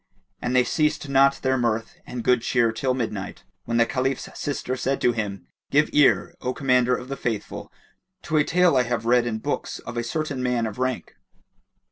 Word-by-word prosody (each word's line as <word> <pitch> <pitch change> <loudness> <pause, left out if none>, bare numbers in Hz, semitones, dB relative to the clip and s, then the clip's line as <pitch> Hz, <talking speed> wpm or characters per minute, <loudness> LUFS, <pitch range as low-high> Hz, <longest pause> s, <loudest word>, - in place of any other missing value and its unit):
And 125 - -1
they 125 - +5
ceased 150 +1 0
not 140 0 +5
their 130 -1 +2
mirth 115 -2 -1
and 125 -2 -5
good 125 0 +3
cheer 120 -1 +2
till 130 +3 -1
midnight, 105 -6 -4 0.2
when 115 0 -1
the 115 - +5
Caliph's 135 +2 -2
sister 130 -2 -3
said 130 +2 -1
to 120 - +4
him, 105 -4 -4 0.2
"Give 150 +2 +3
ear, 145 -2 +4
O 125 0 -2
Commander 125 -2 +3
of 125 - -7
the 135 - -4
Faithful 115 -6 -4 0.5
to 155 - 0
a 150 - +5
tale 180 -1 +3
I 130 - +5
have 120 -1 -2
read 120 0 +3
in 110 -2 -2
books 110 - -3
of 120 - -8
a 120 - 0
certain 145 +2 -3
man 125 -2 0
of 110 +1 -6
rank." 130 -1 -3
125 Hz, 195 wpm, -24 LUFS, 115-135 Hz, 0.5 s, they